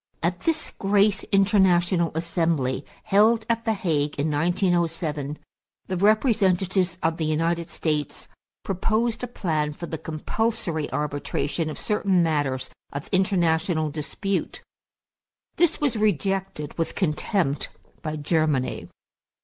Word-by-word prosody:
At 175 Hz, +1 st, 0 dB
this 320 Hz, +7 st, -1 dB
great 200 Hz, 0 st, +3 dB
international 185 Hz, -4 st, +3 dB
assembly, 160 Hz, -6 st, 0 dB, 0.2 s
held 220 Hz, +3 st, +4 dB
at 230 Hz, 0 st, 0 dB
the 225 Hz, -, +2 dB
Hague 150 Hz, -7 st, -1 dB
in 150 Hz, +2 st, +1 dB
1907, 165 Hz, -3 st, 0 dB, 0.5 s
the 185 Hz, -, -3 dB
representatives 190 Hz, -4 st, +2 dB
of 165 Hz, 0 st, +1 dB
the 160 Hz, -, -1 dB
United 165 Hz, +2 st, 0 dB
States 150 Hz, -3 st, -2 dB, 0.4 s
proposed 225 Hz, +5 st, 0 dB
a -, -, -1 dB
plan 155 Hz, -10 st, -1 dB
for 170 Hz, -, -7 dB
the 160 Hz, -2 st, -5 dB
compulsory 160 Hz, +1 st, -2 dB
arbitration 150 Hz, +2 st, -2 dB
of 155 Hz, -, -6 dB
certain 195 Hz, -4 st, +1 dB
matters 145 Hz, -5 st, -1 dB, 0.2 s
of 140 Hz, 0 st, -6 dB
international 170 Hz, -4 st, +2 dB
dispute. 185 Hz, +6 st, -3 dB, 0.9 s
This 345 Hz, -2 st, +3 dB
was 285 Hz, -5 st, +1 dB
rejected 195 Hz, -6 st, -1 dB
with 165 Hz, -, -1 dB
contempt 160 Hz, -3 st, 0 dB, 0.3 s
by 155 Hz, -1 st, -3 dB
Germany. 150 Hz, -3 st, 0 dB
170 Hz, 115 wpm, -25 LUFS, 155-200 Hz, 0.9 s, held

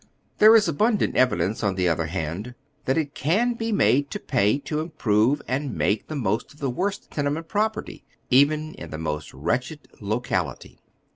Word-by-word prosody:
There 215 Hz, +2 st, +8 dB
is 215 Hz, -4 st, +5 dB
abundant 210 Hz, +7 st, +1 dB
evidence, 110 Hz, -4 st, +1 dB
on 100 Hz, -2 st, +1 dB
the 90 Hz, -1 st, +1 dB
other 80 Hz, -1 st, 0 dB
hand, 90 Hz, +8 st, -4 dB, 0.3 s
that 130 Hz, -, +1 dB
it 145 Hz, -3 st, -1 dB
can 220 Hz, +11 st, +1 dB
be 230 Hz, -1 st, -3 dB
made 145 Hz, -8 st, +3 dB
to -, -, -5 dB
pay 105 Hz, +6 st, +1 dB
to 150 Hz, +1 st, -3 dB
improve 140 Hz, -5 st, +1 dB
and 135 Hz, -1 st, -2 dB
make 105 Hz, +1 st, 0 dB
the 155 Hz, -, -5 dB
most 115 Hz, +2 st, -2 dB
of -, -, -21 dB
the 135 Hz, -3 st, -1 dB
worst 195 Hz, +9 st, -3 dB
tenement 150 Hz, +3 st, -2 dB
property, 215 Hz, +1 st, -2 dB, 0.3 s
even 150 Hz, +4 st, +3 dB
in -, -, -9 dB
the 80 Hz, -, -6 dB
most 75 Hz, -1 st, -4 dB
wretched 125 Hz, -, -2 dB, 0.2 s
lo 105 Hz, +2 st, -1 dB
cality. 90 Hz, -, -3 dB
135 Hz, 180 wpm, -24 LUFS, 100-155 Hz, 0.3 s, There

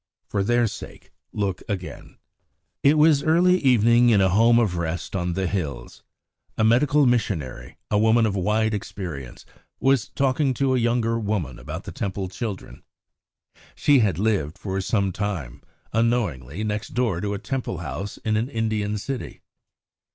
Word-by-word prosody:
For 100 Hz, -2 st, -1 dB
their 120 Hz, +3 st, +2 dB
sake 110 Hz, -, -8 dB, 0.2 s
look 100 Hz, -3 st, -2 dB
again. 90 Hz, -6 st, -6 dB, 0.6 s
It 145 Hz, +3 st, +4 dB
was 150 Hz, -2 st, +5 dB
early 175 Hz, +4 st, +4 dB
evening 120 Hz, -3 st, +4 dB
in 110 Hz, -3 st, +5 dB
a 95 Hz, -1 st, +4 dB
home 115 Hz, +5 st, +4 dB
of 110 Hz, -7 st, +2 dB
rest 85 Hz, +2 st, -3 dB
on 90 Hz, -2 st, -1 dB
the 95 Hz, +2 st, -1 dB
hills. 85 Hz, -6 st, -4 dB, 0.6 s
A -, -, +2 dB
medical 140 Hz, +6 st, +4 dB
missionary, 80 Hz, -, -1 dB
a 105 Hz, -, +3 dB
woman 110 Hz, +1 st, +4 dB
of 105 Hz, -2 st, -1 dB
wide 110 Hz, +3 st, +1 dB
experience, 85 Hz, -, -6 dB, 0.3 s
was 135 Hz, -4 st, +2 dB
talking 135 Hz, 0 st, +1 dB
to 135 Hz, 0 st, +1 dB
a 130 Hz, -, +2 dB
younger 115 Hz, -1 st, +1 dB
woman 100 Hz, -, -2 dB
about -, -, -7 dB
the -, -, -7 dB
Temple 95 Hz, -1 st, -4 dB
children. 105 Hz, 0 st, -6 dB, 0.9 s
She 145 Hz, -2 st, +4 dB
had 100 Hz, -8 st, +1 dB
lived 95 Hz, -6 st, 0 dB
for 95 Hz, 0 st, -3 dB
some 100 Hz, -1 st, 0 dB
time, 90 Hz, -, -4 dB, 0.3 s
unknowingly, 105 Hz, -, 0 dB
next 105 Hz, +1 st, -4 dB
door 115 Hz, -9 st, 0 dB
to 100 Hz, 0 st, -2 dB
a -, -, -3 dB
Temple 130 Hz, -4 st, -4 dB
house 80 Hz, +5 st, -5 dB
in 110 Hz, -1 st, -1 dB
an 115 Hz, +4 st, -1 dB
Indian 110 Hz, -3 st, -1 dB
city. 130 Hz, +4 st, -6 dB
105 Hz, 155 wpm, -24 LUFS, 95-120 Hz, 0.9 s, was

